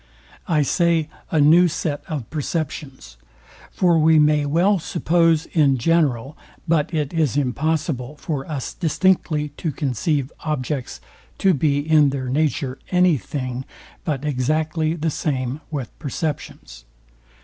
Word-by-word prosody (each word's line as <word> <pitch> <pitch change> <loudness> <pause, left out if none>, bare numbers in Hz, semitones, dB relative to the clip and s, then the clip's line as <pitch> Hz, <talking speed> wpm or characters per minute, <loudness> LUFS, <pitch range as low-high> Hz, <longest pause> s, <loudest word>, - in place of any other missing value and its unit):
I 155 -3 +2
say, 165 0 +1 0.2
a 160 - +1
new 165 +5 +6
set 155 -3 -3
of 150 -9 -4
perceptions: 145 - -4 0.5
For 175 -3 +2
we 160 +1 +5
may 150 -1 +3
well 180 +7 +3
suppose 165 -1 +2
in 145 -5 +2
general, 140 -2 +1 0.3
but 160 -1 +1
it 150 -3 -2
is 155 -5 +1
impossible 145 0 -1
for 145 -4 -3
us 140 -4 -4
distinctly 165 -3 +1
to 160 - -2
conceive, 140 +1 -1
objects 140 -3 -3 0.4
to 190 -1 +3
be 145 -1 +1
in 155 -3 +5
their 135 -2 -3
nature 140 -2 -1
any 180 -5 +3
thing 130 +3 -4 0.4
but 150 -2 -2
exactly 155 +4 0
the 160 -1 -1
same 135 -1 -2
with 140 -7 -4
perceptions. 140 - -5
150 Hz, 125 wpm, -22 LUFS, 135-160 Hz, 0.5 s, new